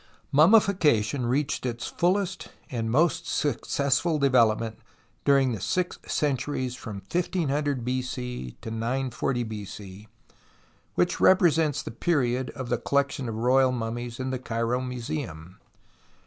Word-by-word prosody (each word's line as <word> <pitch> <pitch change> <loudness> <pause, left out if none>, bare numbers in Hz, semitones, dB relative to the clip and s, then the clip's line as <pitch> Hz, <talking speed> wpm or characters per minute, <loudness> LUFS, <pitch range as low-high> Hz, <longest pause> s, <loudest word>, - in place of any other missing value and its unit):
Mummification 150 - +4
reached 140 +4 0
its 120 -1 -3
fullest 190 +1 0 0.2
and 115 -3 -2
most 155 +5 +2
successful 140 +3 0
development 115 -5 +2 0.5
during 135 -2 +4
the 110 -5 -4
six 180 - -1
cen 145 -3 +1
turies 130 -1 -3
from 105 -5 -8
1500 145 -7 0
B.C. 125 - -4
to 110 - -6
940 120 +2 -1
B.C., 105 -2 -8 0.9
which - - +1
repre 180 -4 +5
sents 155 -3 0
the - - -6
period 125 -2 0
of 130 -3 -5
the 120 - 0
collection 140 -2 0
of 110 - -4
royal 130 +3 +3
mummies 120 0 -4
in 130 0 -2
the 130 - -2
Cairo 115 0 -1
IVluseum. 120 - -5
130 Hz, 125 wpm, -26 LUFS, 115-145 Hz, 0.9 s, repre